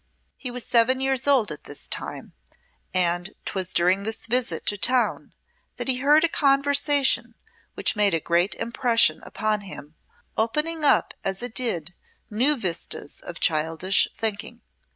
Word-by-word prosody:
He 255 - -7
was 245 -1 -3
seven 245 +2 +3
years 265 0 0
old 255 - +3
at 150 - -8
this 145 - -6
time, - - -6 0.6
and 175 +1 0
'twas 185 -2 -3
during 180 +3 +2
this 220 +2 -4
visit 230 -8 -1
to 205 - +1
town 250 +4 0 0.4
that - - -5
he 260 -1 +1
heard 295 +4 +4
a - - +5
conversation 280 -5 +2 0.4
which - - 0
made 205 -4 +2
a - - 0
great 170 +5 0
impression 235 0 +2
upon 215 -1 -2
him, 160 -6 -11 0.4
opening 300 +8 -1
up 290 - +3
as 195 +3 -3
it 245 -2 -5
did 180 -10 -1 0.4
new 255 +8 +2
vistas 175 - -4
of 170 -2 -9
childish 165 +4 +1
thinking. 225 +2 -4
225 Hz, 150 wpm, -24 LUFS, 185-260 Hz, 0.6 s, a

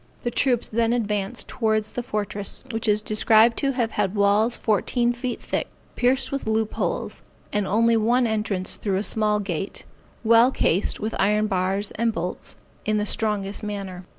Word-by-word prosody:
The 240 - -1
troops 245 -1 +1
then 230 +1 +1
advanced 210 -4 -2
towards 215 -2 -1
the 245 - -2
fortress, 205 -3 -3
which 225 0 -2
is 210 0 +2
described 220 +2 +4
to 275 -1 0
have 235 -3 -1
had 205 -1 -1
walls 205 +3 +3
fourteen 235 +3 +1
feet 245 0 -4
thick, - - -2 0.3
pierced 260 +1 +2
with 275 -4 -3
loop 220 0 0
holes, - - -3 0.3
and 205 -2 0
only 230 +3 +3
one 240 +3 +3
entrance 210 -4 -1
through 195 -3 -1
a 200 - -1
small 210 -1 +1
gate, 195 -1 -4 0.4
well 230 +2 +6
cased 195 -7 0
with 215 +1 -3
iron 210 +2 +3
bars 195 0 0
and 230 0 +2
bolts, 175 0 -5 0.3
in 215 0 0
the 210 - 0
strongest 205 -2 -1
manner. 195 -3 -5
215 Hz, 170 wpm, -24 LUFS, 205-230 Hz, 0.4 s, well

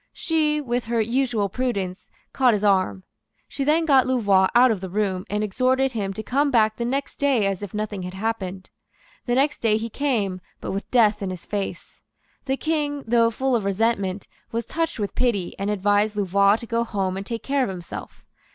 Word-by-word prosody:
She, 310 -3 +1
with 245 -4 -2
her 230 0 0
usual 230 -2 +1
prudence, 195 -5 -3 0.2
caught 250 -4 +4
his 205 - -3
arm. 185 - +2 0.4
She 275 - -3
then 310 +4 +2
got 270 -5 +4
Louvois 200 -7 +3
out 250 +1 +7
of 205 -4 -2
the 190 - -5
room, 190 -1 -1
and 210 +1 -1
exhorted 255 +5 +1
him 205 -5 -2
to 220 - -6
come 285 +6 +1
back 220 -4 +3
the 235 - -2
next 275 +3 -2
day 270 -7 +2
as 195 -1 -1
if 205 -3 -6
nothing 210 -2 -3
had 180 +1 -6
happened. 190 -3 -4 0.6
The 240 - +2
next 285 +3 +2
day 215 -2 +2
he 225 +1 -5
came; 210 -11 -1 0.2
but - - -5
with 195 +1 -4
death 215 -4 +3
in 195 - -2
his 185 -2 -7
face. 200 -2 -5 0.4
The 270 0 0
King, 295 -3 -1
though 230 0 +4
full 260 +3 0
of 225 - 0
resentment, 200 -1 0 0.2
was 230 0 -2
touched 330 +2 -2
with 205 -3 -3
pity, 220 -8 0
and 200 +1 -1
advised 205 +1 +1
Louvois 200 0 +3
to 230 - -6
go 230 0 0
home 195 -5 -2
and 195 - -4
take 230 +3 -5
care 275 0 0
of 250 - 0
himself. 180 -3 -8
220 Hz, 200 wpm, -23 LUFS, 195-255 Hz, 0.6 s, out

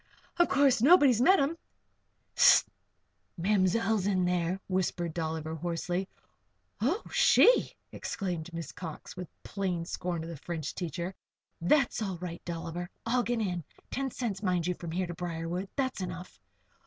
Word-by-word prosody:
Of 345 - +5
course, 275 -4 +4
nobody's 275 -5 +6
met 375 +8 +6
'em?" 300 +4 0 0.7
"Hist! - - +6 0.7
Ma'mzell's 200 +2 +2
in 185 -3 +2
there," 180 +1 0
whispered 180 -3 -1
Dolliver, 160 -1 -3
hoarsely. 175 +3 -2 0.7
"Oh! 325 - +1
She!" - - +5 0.2
exclaimed 175 -4 -4
Miss 165 -1 -6
Cox, 160 -4 -8
with 180 -1 -6 0.2
plain 185 -4 -2
scorn 175 -1 -3
of 165 - -7
the 165 - -7
French 160 0 -5
teacher. 175 +1 -4 0.5
"That's 270 - +2
all 195 -4 -2
right, 170 -1 -7
Dolliver. 170 +1 -5 0.2
I'll 245 +2 +2
get 240 -1 -1
in. 180 -5 -2 0.3
Ten 270 0 -1
cents, 225 -6 -3
mind 180 -4 +1
you, 180 - +1
from 170 -1 -8
here 180 +3 -1
to 175 - -5
Briarwood. 175 +2 -4
That's 260 -6 -1
enough." 180 0 -6
180 Hz, 145 wpm, -30 LUFS, 170-225 Hz, 0.7 s, nobody's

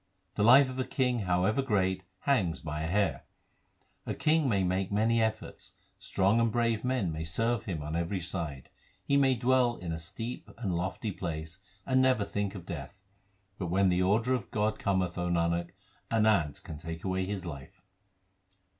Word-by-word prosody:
The 100 - -2
life 130 +6 +7
of 130 0 -6
a - - +2
king, 125 -2 0
however 95 +5 +1
great, 95 -7 +1 0.2
hangs 100 - +1
by 75 -1 -4
a 80 - -2
hair: 100 +3 0 0.8
A - - -2
king 155 -2 +2
may 100 -4 +2
make 95 +1 0
many 115 +3 +2
efforts; 110 -1 -3 0.3
strong 100 +4 +2
and 115 -1 +2
brave 115 -1 +1
men 125 -9 0
may 80 +1 -4
serve 115 +7 0
him 85 -8 -3
on 75 +2 -4
every 85 +3 -1
side; 85 -6 -5 0.3
He 140 - +2
may 135 -2 +4
dwell 125 0 +2
in 85 -2 -5
a 80 - -3
steep 115 +9 -5
and 100 -7 -2
lofty 90 +4 -2
place, 80 -1 -5 0.3
and 130 0 +3
never 130 -5 +3
think 100 0 -3
of 90 -4 -8
death; 85 -2 -6 0.6
But 90 - -2
when 95 +2 +3
the 90 0 +2
order 110 +7 +2
of 125 - -2
God 105 0 0
cometh, 95 -3 0
O 90 0 -1
Nanak, 85 0 +1 0.4
an 110 -1 +2
ant 85 -10 +2
can 75 - -8
take 80 +1 -7
away 95 0 -1
his 100 -2 -4
life. 70 -5 -9
95 Hz, 180 wpm, -30 LUFS, 85-115 Hz, 0.8 s, life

